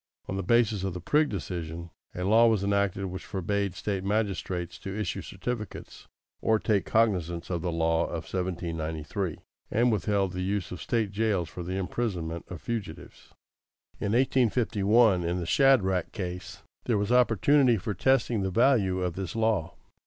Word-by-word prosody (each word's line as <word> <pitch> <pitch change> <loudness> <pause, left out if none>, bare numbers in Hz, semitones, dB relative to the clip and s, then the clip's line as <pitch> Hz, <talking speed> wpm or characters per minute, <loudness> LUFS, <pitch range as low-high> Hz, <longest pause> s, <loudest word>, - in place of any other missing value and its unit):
On 95 - -3
the 95 - -1
basis 105 0 +2
of 95 -2 -2
the - - -4
Prigg 150 - +2
decision, 85 -3 -5 0.2
a 90 - -3
law 110 +5 +5
was 110 -4 +2
enacted 100 -1 0
which 95 0 -6
forbade 100 0 -2
State 95 0 -3
magistrates 95 -4 -2
to 100 +2 -5
issue 105 -5 -2
certificates 120 -4 -6 0.3
or 110 - +3
take 105 -2 0
cognizance 90 -7 +1
of 85 -2 -1
the 90 0 -2
law 80 0 +1
of - - -4
1793, 85 -1 -3 0.3
and 120 +2 +3
withheld 100 -3 +1
the 90 - -3
use 95 -1 -2
of 90 - -6
State 110 -4 0
jails 100 -5 0
for 90 - -7
the 90 +2 -3
imprisonment 90 -5 -3
of 85 -5 -8
fugitives. 95 -6 -6 0.7
In 100 - -1
1851, 115 -5 +3
in 85 +1 -1
the 85 - -3
Shadrach 95 - +3
case, 90 -1 -6 0.2
there 115 -3 +2
was 100 +2 -1
opportunity 125 +1 +4
for 105 +2 -3
testing 120 -3 +2
the 95 - -1
value 95 -4 +3
of 90 -2 -1
this 95 +2 -5
law. 110 -7 0
95 Hz, 160 wpm, -28 LUFS, 90-110 Hz, 0.7 s, law